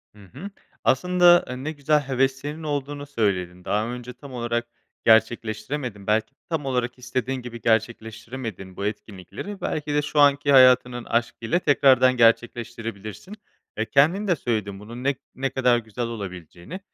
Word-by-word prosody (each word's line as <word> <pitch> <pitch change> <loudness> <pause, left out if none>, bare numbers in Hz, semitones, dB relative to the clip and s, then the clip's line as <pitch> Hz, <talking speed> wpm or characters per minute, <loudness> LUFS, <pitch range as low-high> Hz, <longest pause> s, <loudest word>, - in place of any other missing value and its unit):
Hı 105 -1 -15
hı. 175 +10 -7 0.3
Aslında, 175 +4 +4
eee, 125 - -5
ne 155 - -2
güzel 150 0 +1
heveslerinin 135 +3 -2
olduğunu 145 -1 -3
söyledin. 95 -9 -2
Daha 105 +2 0
önce 125 0 -7
tam 135 +2 -12
olarak 120 -1 -2 0.4
gerçekleştiremedin, 110 0 +1
belki 110 +4 +1 0.2
tam 160 -4 -2
olarak 125 -1 -2
istediğin 130 +1 -3
gibi 120 -1 -9
gerçekleştiremediğin 110 -3 -3
bu 100 - -3
etkinlikleri, 105 - -7
belki 150 -1 -2
de 150 - +2
şu 150 0 -2
anki 145 0 +4
hayatının 125 -2 +5
aşkıyla 115 +5 -1
tekrardan 130 -5 +4
gerçekleştirebilirsin. 115 - -1 0.4
E, 110 - 0
kendin 165 - +3
de 180 - +3
söyledin 105 -7 -3
bunun 115 +4 -9
ne 140 +1 +1 0.2
ne 135 +1 -1
kadar 125 -2 +2
güzel 115 +1 -4
olabileceğini. 95 - -8
125 Hz, 140 wpm, -24 LUFS, 110-140 Hz, 0.4 s, hayatının